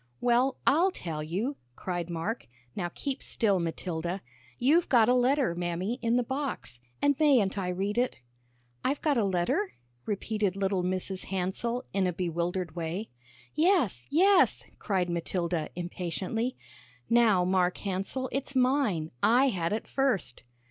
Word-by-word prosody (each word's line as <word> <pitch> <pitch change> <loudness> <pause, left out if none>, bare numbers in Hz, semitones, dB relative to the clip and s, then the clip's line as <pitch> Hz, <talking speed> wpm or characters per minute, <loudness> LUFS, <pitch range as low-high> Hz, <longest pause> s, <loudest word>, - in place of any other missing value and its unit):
"Well, 245 +2 +2
I'll 330 +7 +5
tell 165 - -5
you," 195 - -2 0.2
cried 175 0 -3
Mark. 175 +8 -3 0.3
"Now 175 -3 -2
keep 275 +6 -4
still, 200 -5 +1
Matilda. 170 +2 -3 0.3
You've 315 +7 +3
got 235 -4 +5
a 250 - +5
letter, 255 - +3
Mammy, 175 +7 -2
in 230 0 +2
the 250 - +2
box, 265 - -4 0.2
and 285 0 +4
mayn't 260 -11 +4
I 195 -3 -2
read 195 +5 -1
it?" 250 +1 0 0.6
"I've 275 +2 -1
got 290 -5 +3
a - - +2
letter?" 185 +1 0 0.3
repeated 210 -1 -1
little 195 -1 0
Mrs. 185 +1 -2
Hansell, 195 +6 -2
in 195 -2 +2
a 180 - -1
bewildered 175 0 -2
way. 170 +5 -4 0.4
"Yes, 305 - +2
yes," 370 +5 +4 0.2
cried 190 -3 0
Matilda, 170 -1 -2
impatiently. 185 +7 -3 0.5
"Now, 225 -6 +4
Mark 180 -1 +2
Hansell, 200 +7 -3
it's 275 0 -3
mine; 250 - +2
I 255 +4 +5
had 170 -7 -1
it 215 - -2
first." 235 - -1
200 Hz, 140 wpm, -29 LUFS, 180-255 Hz, 0.6 s, I'll